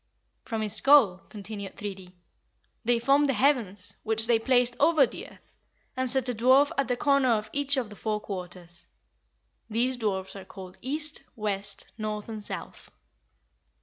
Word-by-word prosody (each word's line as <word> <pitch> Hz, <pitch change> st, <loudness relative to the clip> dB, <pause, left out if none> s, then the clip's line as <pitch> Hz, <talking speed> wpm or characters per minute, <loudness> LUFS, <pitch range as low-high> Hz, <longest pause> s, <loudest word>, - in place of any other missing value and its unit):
"From 225 Hz, -2 st, -3 dB
his 210 Hz, -1 st, -2 dB
skull," 220 Hz, -6 st, +6 dB
continued 205 Hz, -1 st, -7 dB
Thridi, 190 Hz, -3 st, -7 dB, 0.7 s
"they 240 Hz, +1 st, +2 dB
formed 275 Hz, +5 st, +3 dB
the 270 Hz, -, +1 dB
heavens, 230 Hz, -9 st, +1 dB
which 220 Hz, 0 st, +3 dB
they 230 Hz, -1 st, +3 dB
placed 245 Hz, 0 st, +2 dB
over 310 Hz, -1 st, +5 dB
the -, -, -8 dB
earth, -, -, -20 dB, 0.4 s
and 260 Hz, 0 st, -1 dB
set 260 Hz, 0 st, 0 dB
a 250 Hz, -, 0 dB
dwarf 260 Hz, +6 st, +4 dB
at 275 Hz, -3 st, 0 dB
the 245 Hz, -, 0 dB
corner 275 Hz, -2 st, +3 dB
of 215 Hz, -2 st, 0 dB
each 280 Hz, 0 st, +1 dB
of 235 Hz, -5 st, -2 dB
the -, -, -9 dB
four 215 Hz, 0 st, -2 dB
quarters. 180 Hz, -4 st, -7 dB, 0.8 s
These 245 Hz, +4 st, 0 dB
dwarfs 195 Hz, -5 st, -2 dB
are 195 Hz, -, -8 dB
called 185 Hz, -1 st, -11 dB
East, 300 Hz, +4 st, -3 dB
West, 205 Hz, -2 st, -2 dB
North, 215 Hz, -1 st, -4 dB
and 215 Hz, -2 st, -6 dB
South. -, -, -8 dB
225 Hz, 160 wpm, -27 LUFS, 205-260 Hz, 0.8 s, skull